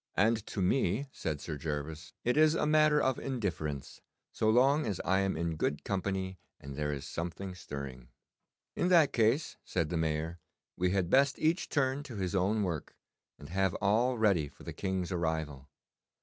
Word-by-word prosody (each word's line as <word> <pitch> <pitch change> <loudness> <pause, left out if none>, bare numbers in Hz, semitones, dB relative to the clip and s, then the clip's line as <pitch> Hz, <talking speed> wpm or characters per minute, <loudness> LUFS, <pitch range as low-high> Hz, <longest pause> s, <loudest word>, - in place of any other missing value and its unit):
'And 110 +2 +3
to 95 - -2
me,' 105 +4 +1
said 75 - -3
Sir 80 -3 -5
Gervas, 75 +2 -5
'it 125 - +2
is 155 +1 +5
a - - +1
matter 155 0 +5
of 130 -3 +1
indifference, 85 - -3 0.3
so 110 - +1
long 135 +6 +4
as 100 -4 -2
I 95 +1 +3
am 95 -4 0
in 85 -1 -1
good 75 -1 -1
company 95 -1 -2 0.2
and 70 0 -8
there 75 0 -1
is 70 -1 -4
something 85 +5 -5
stirring.' 70 -7 -7 0.7
'In 175 - +1
that 170 -6 +5
case,' 120 +7 +2
said 85 -4 -1
the 85 - -1
Mayor, 80 +1 -1 0.4
'we 90 0 +1
had 95 -2 0
best 140 +1 +4
each 160 +4 +1
turn 135 -1 +1
to 140 -5 -9
his 95 -2 -2
own 100 +3 +2
work, 85 -6 -3 0.4
and 70 - -11
have 95 0 +1
all 115 +5 +2
ready 100 -9 +3
for 70 - -17
the - - -6
King's 95 -2 -2
arrival. 80 -5 -2
95 Hz, 175 wpm, -31 LUFS, 80-120 Hz, 0.7 s, is